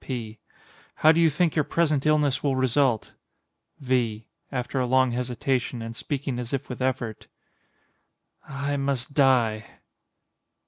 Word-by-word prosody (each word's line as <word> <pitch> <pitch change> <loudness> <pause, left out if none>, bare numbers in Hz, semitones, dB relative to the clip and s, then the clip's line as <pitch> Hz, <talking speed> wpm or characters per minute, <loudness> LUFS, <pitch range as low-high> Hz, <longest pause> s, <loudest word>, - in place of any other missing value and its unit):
P. 115 -4 -5 0.7
How 155 - +10
do 165 - +2
you 165 -1 +5
think 160 +2 0
your 155 - +3
present 155 -2 +1
illness 145 -4 +2
will 140 -2 +1
result? 130 -2 +1 0.6
V. 120 -5 -1 0.3
[After 130 0 -2
a 125 - 0
long 130 0 +3
hesitation 125 0 -2
and 115 0 -7
speaking 135 -1 -3
as 125 +1 -5
if 135 0 -3
with 125 0 -6
effort.] 125 -4 -2 1.2
I 140 +1 -2
must 135 -1 -2
die. 125 -6 +3
130 Hz, 135 wpm, -25 LUFS, 120-140 Hz, 1.2 s, How